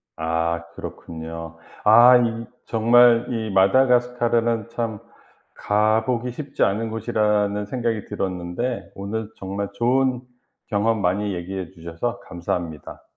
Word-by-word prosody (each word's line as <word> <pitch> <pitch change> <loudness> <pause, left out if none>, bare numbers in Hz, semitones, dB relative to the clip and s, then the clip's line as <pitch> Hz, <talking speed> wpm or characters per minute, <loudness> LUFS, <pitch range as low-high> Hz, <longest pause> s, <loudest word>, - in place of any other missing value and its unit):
아 80 +1 -1
그렇군요. 80 0 -8 0.3
아 120 +4 +8
이 115 -1 -1 0.2
정말 120 +1 +5
이 110 -3 -3
마다가스카르는 120 +1 +2
참 115 -3 -3 0.6
가 110 +2 +2
보기 125 -1 -1
쉽지 140 +4 -3
않은 110 +3 0
곳이라는 105 -2 0
생각이 115 -3 -2
들었는데 95 +6 -4
오늘 105 +2 -4
정말 100 +1 -4
좋은 125 +2 +1 0.5
경험 110 +1 +1
많이 100 +2 0
얘기해 90 0 -5
주셔서 85 +7 -5
감사합니다. 85 -3 -5
110 Hz, 260 characters per minute, -22 LUFS, 95-120 Hz, 0.6 s, 아